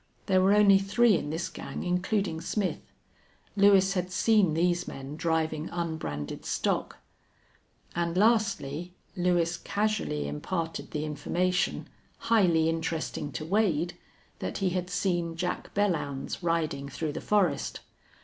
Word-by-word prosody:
There 185 -1 +3
were 195 +2 +5
only 200 -2 +6
three 210 +4 +3
in 145 - -2
this 160 +3 -2
gang, - - -6
including 180 -1 0
Smith. 200 0 -1 0.8
Lewis 195 -1 +5
had 180 -1 -2
seen 185 -3 +3
these 175 +1 +1
men 135 +2 -7
driving 160 -1 -1
unbranded 160 - -4
stock. - - -1 1.0
And 170 0 -1
lastly, 190 -7 +1 0.2
Lewis 175 -2 +1
casually 205 - -1
imparted 160 - -3
the 150 0 -3
information, 180 +4 -1 0.3
highly 175 -8 +3
interesting 165 -2 -2
to 140 +6 -4
Wade, 175 -3 +1 0.4
that - - -3
he 190 -2 0
had 180 0 -2
seen 175 -3 -1
Jack 180 +1 -3
Belllounds 165 -10 -1
riding 155 -5 -1
through 155 +2 -3
the - - -5
forest. 190 -9 +1
175 Hz, 125 wpm, -28 LUFS, 160-195 Hz, 1.0 s, only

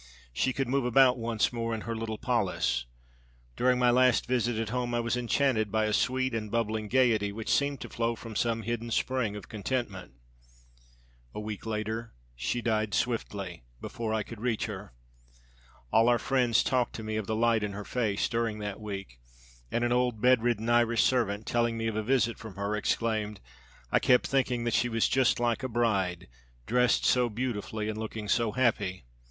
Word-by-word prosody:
She 130 - +1
could 135 0 -2
move 135 +1 +1
about 125 +1 +4
once 115 0 0
more 115 -1 -2
in 110 - -5
her 115 +1 -4
little 110 -1 -4
polis. 90 - 0 0.7
During 125 0 +3
my 125 -1 +4
last 125 -1 +4
visit 120 -2 0
at 110 -1 -2
home 120 0 -1
I - - +1
was 120 +1 0
enchanted 120 -3 +1
by 110 0 +2
a 105 - 0
sweet 130 +2 +1
and 110 -2 -3
bubbling 110 -1 -1
gayety 115 -4 +2
which 110 +2 -2
seemed 140 -1 +1
to - - -6
flow 115 0 -1
from 115 -1 -9
some 115 0 0
hidden 115 +1 -3
spring 115 -2 0
of 105 - -8
contentment. 105 -3 -4 1.2
A - - -3
week 105 0 -6
later 110 +1 -3 0.2
she 65 - -2
died 110 -3 0
swiftly, 100 -7 -2 0.2
before 115 -2 -4
I 110 -1 0
could 115 -1 -10
reach 120 -3 0
her. - - -7 1.0
All 115 +2 +5
our 120 - +4
friends 125 -3 +2
talked 125 -2 +1
to 110 - -6
me 110 0 -3
of 110 -2 -3
the 110 - -1
light 115 0 +3
in 105 -1 -3
her 105 0 -6
face 110 -5 0
during 115 -2 -1
that 105 -1 -5
week, 95 - -7 0.5
and 120 - -1
an 120 - +1
old 125 -2 +1
bedridden 120 -2 +3
Irish 120 0 +3
servant, 110 -4 +1
telling 120 -1 0
me 115 - -2
of 110 -1 -1
a 110 - 0
visit 115 0 +1
from 110 -5 -9
her, 100 +1 -2
exclaimed, 105 -1 -1 0.5
'I - - +4
kept 125 - +4
thinking 125 -3 0
that 120 -1 -1
she 125 - +2
was 115 -1 +2
just 130 -2 +2
like 120 +1 +1
a 130 - -3
bride, 100 -7 0 0.4
dressed 125 0 +2
so 125 -1 +3
beautifully 110 -2 -3
and 110 0 -3
looking 110 -1 -5
so 110 +1 +1
happy.' 105 - 0
115 Hz, 190 wpm, -29 LUFS, 105-120 Hz, 1.2 s, All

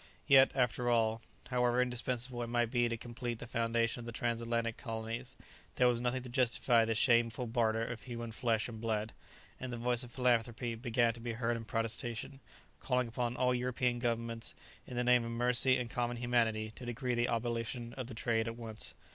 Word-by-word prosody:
Yet, 135 -2 +7
after 125 -1 +1
all, 115 -1 +2 0.3
however 125 -1 +2
indispensable 125 0 -1
it 120 - -3
might 120 -1 +1
be 120 -2 +2
to 115 - -2
complete 120 0 -5
the 125 - -8
foundation 115 0 0
of 120 - -8
the - - -4
trans 115 0 -1
atlantic 115 -1 -1
colonies, 115 +1 -5 0.4
there 125 - +5
was 120 -1 +2
nothing 125 +1 -1
to - - -7
justify 120 -2 +3
this 115 -1 0
shameful 120 0 +3
barter 115 -1 +1
of 120 -1 -5
human 120 -2 -6
flesh 115 -2 0
and 110 -2 -8
blood, 110 -1 -1 0.5
and 130 -1 -5
the 120 - -4
voice 120 0 +1
of 120 -2 -5
philanthropy 120 -1 +1
began 115 0 +1
to 115 - -11
be 115 0 -3
heard 115 +1 0
in 115 -1 -5
protestation, 115 +4 -3 0.4
calling 125 -2 0
upon 120 0 -2
all 125 0 +3
European 125 0 0
governments, 115 -1 -2 0.3
in 125 - -6
the 125 - +2
name 125 -1 +5
of 115 - -4
mercy 125 +2 +3
and 120 -1 -4
common 120 0 -1
humanity, 115 -3 +1
to - - -9
decree 125 +1 -2
the 120 0 +2
abolition 115 0 -2
of 130 -3 -5
the 120 - -8
trade 115 0 0
at 115 0 -4
once. 110 -2 -6
120 Hz, 195 wpm, -34 LUFS, 115-125 Hz, 0.5 s, Yet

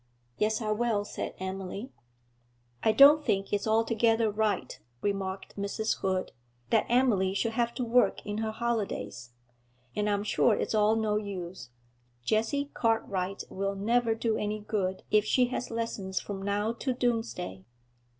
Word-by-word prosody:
'Yes, 215 +2 0
I 215 - -1
will,' 215 -2 +1
said - - -5
Emily. 190 +4 -5 0.9
'I 220 - +4
don't 295 +4 +8
think 195 -6 0
it's 205 +1 0
altogether 225 0 +3
right,' 210 -10 -1 0.2
remarked 195 -1 -3
Mrs. 200 +2 -1
Hood, 185 -1 -1 0.4
'that 225 - +3
Emily 220 -7 +3
should 230 +3 0
have 235 +1 0
to 255 - -2
work 235 -3 +2
in 210 +1 -3
her 220 0 -1
holidays; 215 - -3 0.7
and 210 0 0
I'm 205 0 +1
sure 215 +1 +3
it's - - -2
all 215 0 +4
no 215 -1 +1
use; 185 - -6 0.5
Jessie 230 - 0
Cartwright 195 -4 0
will 195 +1 -2
never 225 +3 +2
do 225 -1 0
any 210 +1 -2
good 200 -3 -2
if 210 -1 +5
she 245 +3 +2
has 250 - -3
lessons 220 -5 -2
from 195 -2 -6
now 205 +3 0
to 255 +2 -2
Doomsday.' 225 - -2
215 Hz, 150 wpm, -29 LUFS, 195-230 Hz, 0.9 s, don't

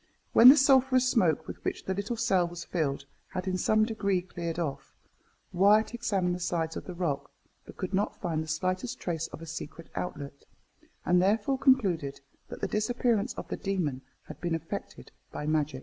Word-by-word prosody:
When 245 - +10
the 285 - +9
sulphureous 265 -2 +4
smoke, 165 - +2
with - - -8
which - - -3
the 190 - -1
little 200 +5 -3
cell 190 -6 +2
was 175 0 -7
filled, 140 -5 -2 0.3
had 185 0 -3
in 185 - 0
some 215 +4 +3
degree 200 -5 -1
cleared 170 -2 -5
off, 155 -6 -4 0.6
Wyat 205 +5 +4
examined 200 -7 0
the 180 - -4
sides 165 -2 -2
of - - -6
the 180 - -7
rock, 145 -6 -2 0.4
but - - -12
could 185 0 -4
not 200 +2 -1
find 165 -5 -1
the - - -10
slightest 185 +10 -2
trace 165 -2 -3
of 165 - -10
a - - -7
secret 160 0 -8
outlet, 140 -5 -6 0.6
and 180 0 +4
therefore 215 +7 +1
concluded 190 - +2 0.3
that - - -8
the - - 0
disappearance 230 0 0
of - - -7
the - - -3
demon 175 -10 -2 0.2
had - - -11
been 175 -2 0
effected 165 - -7 0.2
by 150 - -5
magic. 150 -3 0
185 Hz, 185 wpm, -29 LUFS, 165-215 Hz, 0.6 s, When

